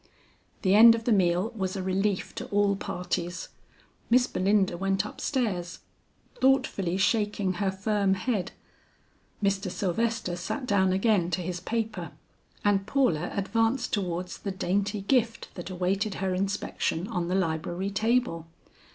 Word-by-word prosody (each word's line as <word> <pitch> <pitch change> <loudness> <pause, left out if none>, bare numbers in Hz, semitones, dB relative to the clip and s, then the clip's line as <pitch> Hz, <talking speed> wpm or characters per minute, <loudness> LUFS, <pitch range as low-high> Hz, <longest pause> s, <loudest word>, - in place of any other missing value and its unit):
The 190 -1 +3
end 230 +2 +9
of 230 - -5
the 240 - +1
meal 185 +1 +2
was 190 -2 -2
a 190 - -3
relief 190 +1 -1
to - - -6
all 200 0 +2
parties. 180 -3 -4 0.6
Miss 245 +1 +5
Belinda 195 -2 +1
went 195 +2 0
up - - -8
stairs, 195 -11 -1 0.6
thoughtfully 255 -9 +2
shaking 205 -1 +1
her 195 +2 0
firm 195 0 +1
head; 195 -2 -2 0.9
Mr. 195 0 +1
Sylvester 195 +1 -1
sat 190 +10 -4
down 190 -4 +2
again 195 -2 +2
to 180 +1 -1
his 180 0 -3
paper, 225 +4 -3 0.5
and 200 -1 +2
Paula 180 - +1
advanced 225 +5 0
towards 180 -2 -2
the 200 - -4
dainty 200 +2 -1
gift 230 +1 0
that 175 0 -7
awaited 190 +3 -1
her 190 -1 -1
inspection 190 -2 -1
on 175 -4 -2
the 180 - 0
library 175 +2 -1
table. 220 -6 0
195 Hz, 140 wpm, -27 LUFS, 185-215 Hz, 0.9 s, end